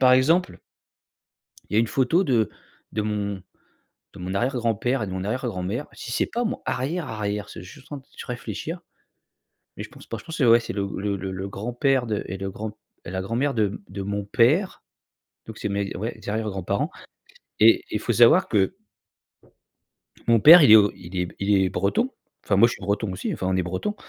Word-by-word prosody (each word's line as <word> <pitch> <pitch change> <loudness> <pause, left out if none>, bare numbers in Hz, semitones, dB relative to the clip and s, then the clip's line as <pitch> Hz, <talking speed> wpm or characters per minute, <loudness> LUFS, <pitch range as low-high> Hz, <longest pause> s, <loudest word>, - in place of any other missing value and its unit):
par 130 -1 +6
exemple 160 +8 +3 1.1
il - - -4
y - - +3
a - - +6
une 115 - +1
photo 135 - +2
de 115 - +1 0.4
de 105 - -1
mon 100 -2 -3 0.7
de 95 - -12
mon 90 +2 -4
arrière-grand-père, 120 +1 0
et - - -2
de 95 - -6
mon 95 0 -4
arrière-grand-mère. 110 0 -3
Si 120 - -8
c'est - - +1
pas 240 +1 -2
mon 240 +3 -3
arrière 155 +6 -2
arrière, 105 -2 -3
je - - -9
suis - - -9
juste 130 +10 -14
en 145 - -5
train 135 - -29
de - - -10
réfléchir, 125 - -5 1.0
mais - - -5
je - - -10
pense - - -15
pas. - - -5
Je - - -12
pense 165 0 -6
c'est 135 - +2
ouais, 115 0 +7
c'est 115 - -6
le 100 -1 -2
le 100 +1 -1
le 95 +1 -5
grand-père 120 +5 0
de 105 -2 -2
et 95 - -5
de 95 0 -4
grand 105 +2 -6 0.3
et 85 - -7
la 95 0 -2
grand-mère 120 +8 -1
de 110 -3 +2
m 100 - -7
de 95 +1 -6
mon 100 0 -3
père, 140 - +2 0.6
donc 110 - -9
c'est - - -3
mes 100 0 -2
ouais, 110 +2 -5
arrières 110 +1 -1
grands-parents, 95 0 -2 0.7
et 110 +1 +6
il 105 - -1
faut 120 - -1
savoir 120 - +6
que 95 -3 +1 1.5
mon 115 -2 +4
père 165 +6 +10
il 115 -7 +7
est - - +12
o 105 -1 +5
il 90 +1 -10
est 90 - 0
b - - -12
il 100 0 +2
est 95 - +2
breton. 230 - 0 0.3
Enfin 100 - +1
moi 110 - +7
je - - -4
suis - - -9
breton 100 +1 -1
aussi, 90 - -3
enfin 95 - -4
on 95 - +1
est 90 - +1
bretons. 95 - -3
110 Hz, 215 wpm, -24 LUFS, 100-125 Hz, 1.5 s, est